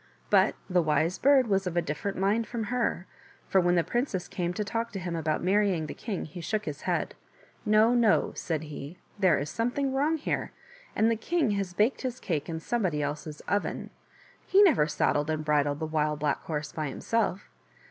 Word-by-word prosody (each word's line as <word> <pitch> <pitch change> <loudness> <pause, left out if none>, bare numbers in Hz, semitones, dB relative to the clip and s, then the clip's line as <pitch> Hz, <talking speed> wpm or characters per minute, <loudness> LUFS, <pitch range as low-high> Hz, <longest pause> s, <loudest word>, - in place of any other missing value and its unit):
But - - +4
the 180 -2 +3
Wise 160 +2 +1
Bird 275 -1 +5
was 195 -3 +1
of 175 -1 -3
a - - +4
different 165 +6 -3
mind 205 +4 +1
from 235 -1 -3
her, 235 -7 0 0.4
for 190 - +4
when 175 0 +3
the 170 - +3
princess 225 - -2
came 175 -1 -2
to 210 - -1
talk 230 +3 -3
to 195 - -3
him 175 -2 -4
about 155 -1 -1
marrying 190 -3 +2
the 150 - -6
king 210 -6 -4
he 175 +3 -9
shook 215 +5 -2
his 150 -1 -5
head. - - -1 0.3
" - - -29
No, 215 +3 +5
no," 235 -3 +3
said 160 -2 -3
he, 150 +2 -8
" - - -29
there 185 -5 +4
is 145 +1 -3
something 265 +4 -1
wrong 295 +4 +1
here, 310 - -3 0.4
and 220 +2 +3
the - - +2
king 295 +2 0
has 195 -3 -2
baked 220 +7 +2
his 255 -2 -4
cake 160 -5 -2
in 160 -1 -3
somebody 175 -6 -1
else's 150 +1 -5
oven. 205 0 -2 0.5
He 395 +2 +5
never 295 - +5
saddled 150 0 +1
and 155 -1 -2
bridled 145 -1 +2
the 160 - -2
Wild 155 -1 0
Black 145 -1 -1
Horse 150 -1 -3
by 155 -2 -3
himself. 205 +5 -1
185 Hz, 205 wpm, -28 LUFS, 155-225 Hz, 0.5 s, Bird